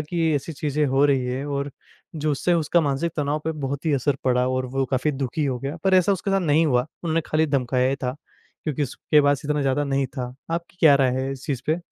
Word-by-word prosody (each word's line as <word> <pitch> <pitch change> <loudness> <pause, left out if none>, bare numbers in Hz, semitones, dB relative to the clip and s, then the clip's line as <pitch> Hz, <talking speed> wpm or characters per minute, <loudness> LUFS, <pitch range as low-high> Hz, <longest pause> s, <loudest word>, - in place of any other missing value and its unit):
कि 165 0 0
ऐसी 145 +3 -3
चीज़ें 150 -1 -1
हो 135 +2 +3
रही 135 -3 +2
हैं 130 +2 -3
और 140 0 -2 0.5
जो 155 0 0
उससे 175 +5 +1
उसका 170 +1 +2
मानसिक 150 +3 -1
तनाव 145 0 0
पे 160 - -1
बहुत 140 +4 -4
ही 155 - +2
असर 140 +1 +1
पड़ा 125 -1 +2
और 130 0 -1
वो 135 - +1
काफ़ी 130 +4 0
दुखी 135 +3 -2
हो 130 -3 -1
गया। 140 +5 -4
पर 190 -1 +4
ऐसा 185 +2 +4
उसके 195 +1 -2
साथ 195 - +2
नहीं 160 -1 +3
हुआ, 125 -1 +2 0.2
उन्होंने 165 0 +1
खाली 155 +1 +2
धमकाया 130 -3 +1
ही 135 - -1
था 125 +2 -2 0.5
क्योंकि 150 -2 -1
उसके 145 +3 +2
पास 145 0 +2
इतना 150 0 0
ज़्यादा 135 +2 +1
नहीं 135 -1 0
था। 125 0 -4 0.2
आपकी 170 +1 -4
क्या 155 -4 +7
राय 135 -2 +3
है 135 - -2
इस 135 0 -9
चीज़ 130 -3 -2
पे? 155 +2 +1
145 Hz, 240 wpm, -23 LUFS, 135-155 Hz, 0.5 s, क्या